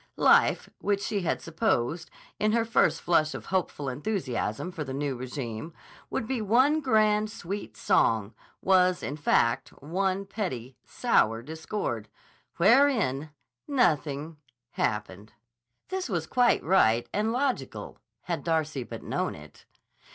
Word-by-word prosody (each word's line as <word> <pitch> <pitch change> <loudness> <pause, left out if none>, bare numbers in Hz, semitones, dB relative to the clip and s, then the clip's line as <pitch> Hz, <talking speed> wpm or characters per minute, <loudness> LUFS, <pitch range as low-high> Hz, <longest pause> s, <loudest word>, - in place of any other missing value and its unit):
Life, - - +4
which 200 -1 0
she 205 -2 -1
had 175 - -1
supposed, 160 -1 -1 0.3
in 215 0 +2
her 230 -1 +2
first 165 -8 +2
flush 155 -3 +2
of - - -7
hopeful 180 -6 -2
enthusiasm 135 - -2
for 160 - -4
the 135 -2 -5
new 140 -1 -2
régime, 125 +2 -6 0.4
would - - -2
be 255 -2 -1
one 255 +9 +4
grand, 215 -4 +3
sweet 205 -2 -6
song, 110 -1 +2 0.3
was, 185 -1 +3
in 145 - -3
fact, 120 -5 +2
one 190 +5 -1
petty, 135 - -4
sour 115 +1 +1
discord—wherein 160 - 0 0.4
nothing 155 - 0 0.3
happened. 105 -1 -3 0.6
This 375 -5 -3
was 170 -5 -1
quite 245 +6 +3
right 120 -11 +3
and 215 +2 +1
logical, 260 +2 -2 0.2
had - - -3
Darcy 155 -4 0
but 120 - -8
known - - -2
it. 75 0 -14
165 Hz, 125 wpm, -28 LUFS, 130-210 Hz, 0.6 s, Life